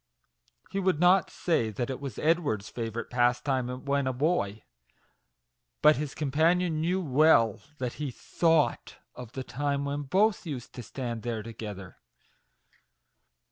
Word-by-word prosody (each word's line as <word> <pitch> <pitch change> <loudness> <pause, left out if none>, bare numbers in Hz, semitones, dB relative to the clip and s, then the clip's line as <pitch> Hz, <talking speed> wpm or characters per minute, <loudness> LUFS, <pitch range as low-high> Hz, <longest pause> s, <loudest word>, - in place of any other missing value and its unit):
He 195 - -1
would 185 -5 +1
not 180 +2 +5
say 140 -11 0
that 120 +5 -3
it 130 - -5
was 140 -2 -6
Ed 165 +2 +3
ward's 110 -11 -3
favourite 115 -1 -5
pastime 125 +1 0
when 140 -1 +1
a - - +1
boy, 125 - 0 1.2
but 150 0 +7
his 145 -1 -4
companion 160 +3 +1
knew 180 +3 +1
well 140 - +4 0.2
that 125 -3 -3
he 145 - -1
thought 160 +4 0 0.2
of 125 -2 -10
the 130 - -4
time 140 +2 -2
when 140 +1 -2
both 195 +9 +2
used 140 -9 -6
to 125 - -7
stand 120 0 -5
there 115 -2 -3
together. 105 -4 -8
135 Hz, 140 wpm, -28 LUFS, 120-160 Hz, 1.2 s, but